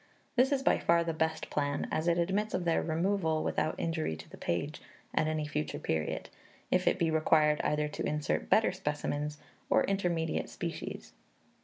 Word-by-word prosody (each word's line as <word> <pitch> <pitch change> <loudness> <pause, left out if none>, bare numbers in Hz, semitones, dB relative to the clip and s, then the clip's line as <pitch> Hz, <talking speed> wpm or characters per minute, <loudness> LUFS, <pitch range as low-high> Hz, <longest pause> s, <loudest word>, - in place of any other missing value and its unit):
This 260 +2 +4
is 270 -1 +1
by - - +4
far 170 0 +3
the 165 -1 -2
best 160 0 -1
plan, 145 -1 0
as 155 +2 0
it 170 0 +3
admits 195 +5 0
of 180 -1 -2
their 165 - +3
removal, 165 -1 +1
without 155 - 0
injury 160 - -1
to 80 +1 -11
the - - -11
page, 145 - -2 0.3
at 155 - +2
any 155 -1 -1
future 75 - -2
period, 80 -1 -2 0.4
if - - +2
it - - +4
be 165 -1 +1
required 155 -1 +4
either 150 0 +1
to - - -4
insert 150 0 -1
better 220 - +5
specimens, 150 -4 -2 0.3
or - - +4
intermediate 175 -5 0
species. - - -5
160 Hz, 175 wpm, -31 LUFS, 150-175 Hz, 0.4 s, better